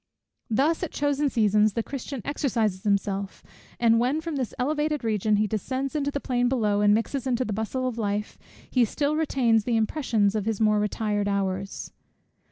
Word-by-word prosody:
Thus, 280 +9 +2
at 355 - -2
chosen 290 0 0
seasons, 215 -3 +3
the 230 - -1
Christian 275 -2 -6
exercises 230 -9 -1
himself; 200 -1 -1 0.4
and 230 -1 +4
when, 255 +6 +1
from 320 -1 -4
this 255 -5 -2
elevated 295 +2 0
region 215 -1 +1
he 210 +1 +2
descends 260 +7 -3
into 285 -1 0
the 285 - -3
plain 245 -2 0
below, 210 -5 +1
and 205 0 +5
mixes 230 +5 0
in 250 - +2
the 255 +2 -1
bustle 220 +5 -2
of 240 -2 -4
life, 210 0 -2 0.3
he 250 - +2
still 285 +6 0
retains 250 -8 +2
the 235 0 +1
impressions 220 -3 +1
of 215 -2 -2
his 225 -3 -1
more 215 -1 +3
retired 210 0 -1
hours. 195 -1 -2
230 Hz, 175 wpm, -26 LUFS, 210-275 Hz, 0.4 s, and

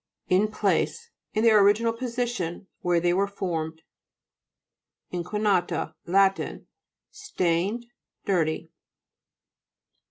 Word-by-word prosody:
IN 190 +4 +4
PLACE 465 - -1 0.2
In 215 - +2
their 215 -3 +6
original 220 +3 +3
position 235 -8 -3
where 175 -1 +2
they 175 +1 +2
were 195 +2 +2
formed. 160 -5 -4 1.3
INIUJINA'TA 200 +2 0
Lat 195 +2 +4 0.7
Stained, 220 - -1 0.4
dirty. 165 -3 0
195 Hz, 85 wpm, -26 LUFS, 175-225 Hz, 1.3 s, their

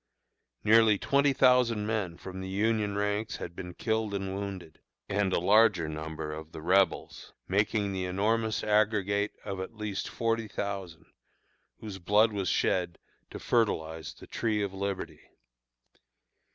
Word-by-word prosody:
Nearly 110 -1 +6
twenty 140 +6 +2
thousand 125 -5 +3
men 105 -6 -2
from 95 0 -8
the 95 - -5
Union 105 +1 0
ranks 105 +2 -1
had 85 - -7
been 90 -1 -7
killed 110 -2 -1
and 95 -1 -3
wounded, 95 -5 -6 0.3
and 100 -1 0
a - - +2
larger 100 -2 +4
number 80 0 -5
of 80 +1 -9
the - - -7
Rebels, 95 +3 +1
making 100 +1 +1
the 95 -1 -2
enormous 110 +4 0
aggregate 105 -1 +1
of 100 -2 -4
at 95 +5 -6
least 105 -2 -4
forty 115 -1 -1
thousand, 95 -5 -5 0.8
whose 105 -3 -7
blood 105 +4 +3
was 100 -2 -1
shed 90 -2 +1 0.3
to - - -7
fertilize 80 -9 -1
the - - -13
Tree 110 -3 -1
of 100 -1 -3
Liberty. 100 -1 -4
100 Hz, 140 wpm, -29 LUFS, 95-110 Hz, 0.8 s, Nearly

